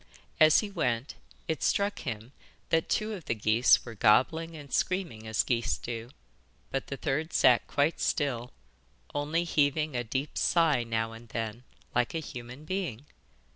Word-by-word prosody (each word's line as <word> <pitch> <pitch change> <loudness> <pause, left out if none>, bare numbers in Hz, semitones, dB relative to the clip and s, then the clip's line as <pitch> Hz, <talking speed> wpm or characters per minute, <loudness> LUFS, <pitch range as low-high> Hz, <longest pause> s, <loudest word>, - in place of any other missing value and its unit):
As 155 -1 +7
he 210 -2 -5
went, 125 -8 -1 0.3
it 160 - -2
struck 200 0 +1
him 115 -3 -5 0.4
that 165 0 +1
two 215 0 0
of 180 -8 -8
the 115 - -1
geese 110 +3 +4
were 120 - -7
gobbling 160 - +3
and 145 -3 -10
screaming 170 - -1
as 110 -1 +1
geese 120 -2 0
do, 115 0 -6 0.6
but 135 - -2
the 140 - -5
third 155 +3 -2
sat 125 -2 +5
quite 145 +3 +1
still, 125 -5 -1 0.6
only 150 +4 0
heaving 150 -2 +1
a 120 - 0
deep 135 +5 -3
sigh 160 -7 +3
now 115 -1 -1
and 115 +1 -12
then, 115 +1 -4 0.3
like 125 +5 +1
a - - 0
human 125 -1 -8
being. 155 - -3
135 Hz, 160 wpm, -29 LUFS, 115-160 Hz, 0.6 s, As